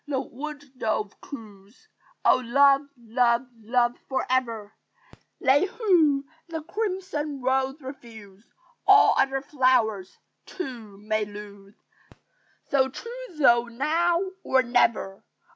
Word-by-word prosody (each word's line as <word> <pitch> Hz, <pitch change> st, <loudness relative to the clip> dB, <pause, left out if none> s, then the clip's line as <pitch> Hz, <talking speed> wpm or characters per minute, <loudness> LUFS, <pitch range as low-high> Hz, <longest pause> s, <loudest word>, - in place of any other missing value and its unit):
the 275 Hz, -3 st, -1 dB
wood 290 Hz, +3 st, -7 dB, 0.2 s
dove 215 Hz, -2 st, -2 dB
coos; 215 Hz, -, -12 dB, 0.4 s
"Oh, -, -, +6 dB
love, 275 Hz, +3 st, +5 dB, 0.2 s
love, 235 Hz, +1 st, +1 dB, 0.2 s
love, 240 Hz, +2 st, +1 dB, 0.2 s
for 265 Hz, -, -1 dB
ever! 230 Hz, -5 st, -1 dB, 0.7 s
They 285 Hz, +5 st, +4 dB
who 330 Hz, -, +2 dB, 0.2 s
the 320 Hz, -2 st, -5 dB
crimson 365 Hz, -7 st, -3 dB
rose 265 Hz, +2 st, 0 dB
refuse, 225 Hz, -7 st, -12 dB, 0.4 s
All -, -, +7 dB
other 270 Hz, 0 st, +1 dB
flowers, 250 Hz, -9 st, +1 dB, 0.3 s
too, 240 Hz, -, -7 dB
may 215 Hz, +1 st, -1 dB
lose 205 Hz, -1 st, -11 dB, 0.9 s
So 265 Hz, -1 st, +1 dB
choose 475 Hz, -, -9 dB
thou 240 Hz, -5 st, +5 dB
now 320 Hz, +8 st, +1 dB, 0.2 s
or 260 Hz, 0 st, +3 dB
never! 235 Hz, -5 st, +1 dB
260 Hz, 110 wpm, -25 LUFS, 220-290 Hz, 0.9 s, All